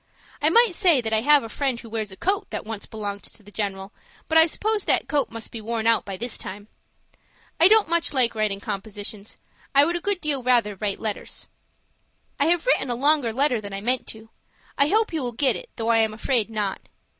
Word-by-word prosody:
I 300 - +3
might 460 +2 +5
say 345 -6 +4
that 225 -2 -2
I 220 - +3
have 290 +2 +5
a - - -6
friend 260 +1 -2
who 230 - -11
wears 220 -2 -4
a 190 - -10
coat 390 +2 -1
that - - -5
once 220 -1 -6
belonged 205 -2 -5
to 215 - -10
the 205 - -15
general. 195 -1 -4 0.3
But 320 0 +5
I 320 - +7
suppose 430 +5 -1
that - - +1
coat 285 -3 0
must 230 -1 -7
be 230 - -7
worn 225 0 -3
out 230 0 +3
by 195 -2 -6
this 240 +2 -2
time. 205 +2 -8 0.9
I 335 - +8
don't 435 +1 +5
much 335 0 +1
like 250 -4 +2
writing 215 -3 -1
compositions. 205 +1 -6 0.4
I 280 +1 +7
would 340 +2 -1
a 345 - -3
good 405 0 0
deal 295 -5 -1
rather 240 -4 +2
write 200 0 -3
letters. 215 -2 -4 0.9
"I 285 - +3
have 345 0 +1
written - - +2
a 240 - 0
longer 280 -2 +2
letter 255 -1 +1
than 200 -1 -8
I 195 - -4
meant 250 +3 -1
to. 220 0 -11 0.4
I 280 - +3
hope 435 +3 +1
you 320 - -1
will 245 -2 -4
get 265 +3 +2
it, - - -8
though 225 0 -2
I 230 - +4
am 220 -1 +1
afraid 230 -1 0
not. 210 -3 -3
235 Hz, 225 wpm, -24 LUFS, 215-300 Hz, 0.9 s, I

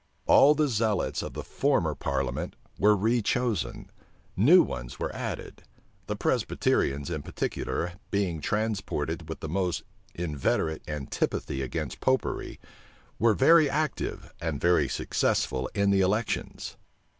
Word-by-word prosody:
All 145 +2 +7
the 150 0 +2
zealots 110 -5 0
of - - -6
the - - -5
former - - +1
parliament 65 -2 -2 0.2
were 105 +2 +5
rechosen: 115 +2 0 0.5
new 150 - +7
ones - - -6
were - - -4
added: - - -5 0.5
the - - -2
Presbyterians, 70 +4 0
in 75 -3 -2
particular, 85 +4 -3 0.2
being 95 -6 -1
transported 90 -7 -2
with 80 - -6
the - - -4
most 90 +1 -1 0.3
inveterate 80 -1 -1
antipathy 70 -2 -2
against 70 +1 -4
Popery, 130 0 -1 0.6
were 115 -2 +4
very 155 +4 +6
active 155 +2 -2
and 80 -4 -2
very 85 -5 +3
successful 65 -1 0
in 100 -1 +3
the 100 -1 +4
elections. 105 +4 -1
95 Hz, 120 wpm, -28 LUFS, 75-115 Hz, 0.6 s, All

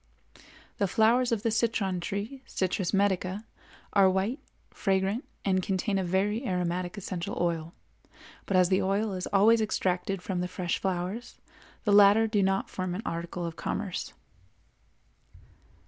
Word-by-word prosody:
The 200 - +2
flowers 235 +5 +3
of 225 -2 0
the 230 - +1
citron 215 -5 0
tree 205 +9 -4
(Citrus 185 -1 -1
medica) 195 +1 0 0.5
are 195 -2 +6
white, 195 +9 0 0.3
fragrant, 195 +5 0 0.2
and 185 -1 +2
contain 195 +2 0
a - - 0
very 200 +6 0
aromatic 180 -2 -2
essential 185 -3 -4
oil; 170 -1 -1 0.7
but 190 - +2
as 180 -1 +4
the 185 - +3
oil 200 +2 0
is 185 -1 -3
always 220 +3 +5
extracted 185 -3 -1
from 185 -2 -2
the 180 - -1
fresh 180 -1 -2
flowers, 190 +5 -3 0.5
the 205 - +2
latter 205 +2 +7
do 215 -2 +1
not 195 0 +1
form 185 -1 -3
an 210 - -5
article 170 +1 -4
of 165 -1 -5
commerce. 195 0 -4
195 Hz, 145 wpm, -28 LUFS, 180-210 Hz, 0.7 s, latter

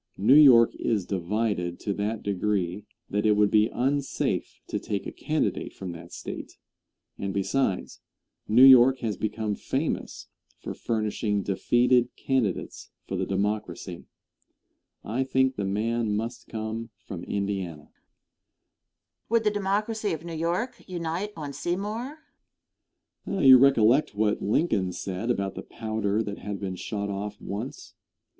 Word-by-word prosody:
New 105 +7 +5
York 130 -6 +8
is 105 -6 0
divided 95 -1 -1
to 100 - -1
that 105 +2 -3
degree 100 -1 -1 0.2
that 105 +1 -1
it 110 - +4
would 105 -1 +3
be 110 0 +4
unsafe 135 +2 -1
to - - -3
take - - -3
a - - -5
candidate - - -2
from 95 -2 -6
that 85 0 -10
State; - - -7 0.6
and 100 0 -3
besides, 100 +1 -1 0.5
New 120 +4 +6
York 130 0 +8
has 110 -4 -1
become 105 +1 -2
famous - - -3 0.3
for - - -6
furnishing 105 -2 -1
defeated 120 +5 +2
candidates 125 -9 -2 0.2
for - - -3
the - - -1
Democracy. 100 -2 -3 1.0
I 120 +5 -1
think 130 0 +2
the 100 - -2
man 110 +2 0
must 115 +2 -4
come 110 +1 -5 0.2
from 90 -3 -7
Indiana. 95 -6 -3
Question. - - -42 1.3
Would 230 0 +3
the 210 - +3
Democracy 210 +1 -1
of 160 +1 -6
New 170 - -6
York 170 +9 -2
unite 175 +3 -3
on 145 -3 -5
Seymour? 210 - -3 1.1
Answer. 195 -2 -1
You 130 -2 +10
recollect 130 -2 +4
what 105 0 +1
Lincoln 100 - +1
said 95 +5 -4
about 100 -5 0
the - - -6
powder 110 -1 -2
that 100 -1 -6
had 105 -1 -5
been 95 -2 -4
shot 100 +2 -4
off 105 +1 -5
once. 110 +7 -6
110 Hz, 140 wpm, -27 LUFS, 100-135 Hz, 1.3 s, You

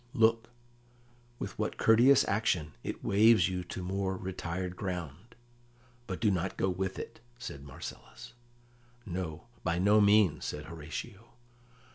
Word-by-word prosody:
"Look, 115 0 +3 0.9
with - - -6
what - - -2
courteous 120 +5 +6
action 95 -7 0
it - - -5
waves 105 -3 +5
you 90 -1 -3
to 90 - -6
more 95 +1 -2
retired 90 -1 -4
ground. 90 - -6 0.7
But 95 -3 -4
do 110 -3 +3
not 95 0 -2
go 95 - +1
with 95 +1 -2
it," - - -7 0.2
said 70 - -7
Marcellus. 70 - -10 0.7
"No, 85 -4 -4 0.2
by 85 0 0
no 105 +4 +5
means," 100 -6 +4
said 75 +1 -4
Horatio. 85 +8 -8
95 Hz, 130 wpm, -31 LUFS, 85-105 Hz, 0.9 s, courteous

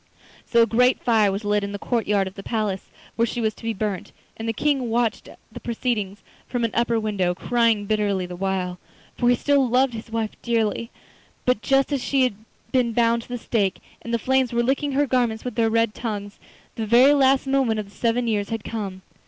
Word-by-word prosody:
So 235 -1 +5
a - - +4
great 250 +2 +3
fire 220 -4 +3
was 200 +3 -3
lit 205 0 +1
in 200 0 -4
the - - -3
courtyard 210 -3 0
of 190 - -7
the 195 - -8
palace, 210 -3 -2 0.3
where 230 - +2
she 240 - -4
was 220 -2 0
to - - -17
be 230 - -1
burnt, 205 -3 -3 0.2
and 225 0 -4
the - - +3
King 270 0 0
watched 235 0 0 0.2
the - - -8
proceedings 225 -4 -3 0.2
from 245 -2 -2
an 225 - -2
upper 235 -1 +1
window, 195 -5 0
crying 230 -1 +1
bitterly 205 -3 0
the 180 0 -7
while, 185 -1 -2 0.4
for 240 - +2
he 245 - +5
still 275 0 +2
loved 255 +1 +3
his 225 +1 -7
wife 225 -1 -2
dearly. 230 -1 0 0.6
But 250 -3 +2
just 275 +1 +2
as 275 - -1
she 270 -2 +2
had 255 - +2 0.4
been 245 -3 +2
bound 235 0 +2
to - - -15
the 245 - -3
stake, 205 -4 0 0.2
and 235 - -7
the 235 - +2
flames 260 +1 +1
were 235 0 +1
licking 275 +3 0
her 290 +2 +3
garments 245 -4 0
with 250 - -3
their 225 0 +2
red 230 -1 +2
tongues, 205 -3 -5 0.4
the 220 -1 -2
very 250 +6 +6
last 270 -1 +4
moment 265 -5 +1
of 210 - -5
the 200 - -19
seven 240 +1 0
years 205 -3 0
had 225 -2 -3
come. 195 -4 -5
230 Hz, 220 wpm, -23 LUFS, 210-245 Hz, 0.6 s, very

